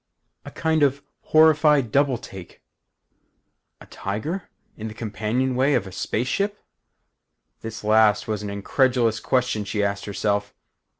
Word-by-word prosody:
A -, -, -7 dB
kind 160 Hz, -1 st, 0 dB
of 140 Hz, 0 st, +2 dB, 0.2 s
horrified 150 Hz, -5 st, +4 dB
double 140 Hz, -1 st, +2 dB
take. 95 Hz, -8 st, -12 dB, 1.2 s
'A -, -, -13 dB
tiger? 145 Hz, -, -5 dB, 0.3 s
In 110 Hz, -, -6 dB
the 110 Hz, -, -8 dB
companionway 125 Hz, +5 st, 0 dB
of -, -, 0 dB
a 95 Hz, -, -9 dB
space 110 Hz, +5 st, -2 dB
ship?' 200 Hz, +7 st, -1 dB, 1.0 s
This 110 Hz, -1 st, -7 dB
last 105 Hz, -1 st, +3 dB
was 105 Hz, -2 st, -2 dB
an 105 Hz, -, -5 dB
incredulous 115 Hz, +2 st, +1 dB
question 125 Hz, -3 st, 0 dB
she 105 Hz, 0 st, -2 dB
asked 100 Hz, 0 st, -2 dB
herself. 100 Hz, 0 st, -2 dB
115 Hz, 130 wpm, -23 LUFS, 105-140 Hz, 1.2 s, horrified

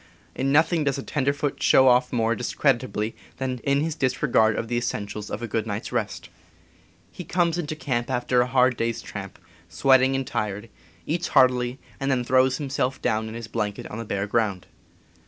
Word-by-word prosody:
In 135 Hz, +1 st, -1 dB
nothing 160 Hz, +2 st, +3 dB
does 140 Hz, -1 st, 0 dB
a 135 Hz, -, -5 dB
ten 150 Hz, -, -2 dB
^, -, -, -2 dB
p. -, -, +5 dB
derfoot 140 Hz, 0 st, -3 dB
show 130 Hz, -, +5 dB
off 125 Hz, 0 st, +4 dB
more 115 Hz, -2 st, +1 dB
discreditably 120 Hz, -3 st, 0 dB, 0.2 s
than 130 Hz, -1 st, -2 dB
J., -, -, -16 dB
in 140 Hz, 0 st, +2 dB
his 160 Hz, +1 st, -1 dB
disregard 130 Hz, -6 st, +2 dB
of 115 Hz, -, -3 dB
the 120 Hz, -, -2 dB
essentials 105 Hz, -3 st, -3 dB
of 105 Hz, -, -5 dB
a -, -, -2 dB
Pi -, -, -17 dB
6C6SSltV. -, -, -27 dB
good 115 Hz, -1 st, -1 dB
night's 105 Hz, 0 st, -4 dB
rest. -, -, -3 dB, 0.8 s
He 180 Hz, -, -8 dB
comes 175 Hz, -1 st, 0 dB
into 155 Hz, -2 st, -3 dB
camp 125 Hz, -5 st, -2 dB
after 125 Hz, -1 st, +1 dB
a 125 Hz, -, +1 dB
hard 125 Hz, -1 st, +3 dB
day's 115 Hz, 0 st, -2 dB
tramp, -, -, -8 dB, 0.3 s
sweating 130 Hz, +10 st, +4 dB
and 135 Hz, 0 st, -1 dB
tired, 105 Hz, -2 st, -3 dB, 0.4 s
eats 170 Hz, +3 st, -1 dB
heartily, 125 Hz, 0 st, +3 dB, 0.2 s
and 135 Hz, -, -1 dB
then 130 Hz, -2 st, +1 dB
throws 130 Hz, +1 st, +3 dB
himself 135 Hz, -3 st, -2 dB
down 110 Hz, 0 st, 0 dB
in 110 Hz, -, -8 dB
his 115 Hz, -1 st, -6 dB
blanket 105 Hz, -2 st, -3 dB
on 110 Hz, -, -5 dB
the -, -, -4 dB
bare 100 Hz, -1 st, -2 dB
ground. 105 Hz, -4 st, -1 dB
125 Hz, 210 wpm, -24 LUFS, 115-135 Hz, 0.8 s, p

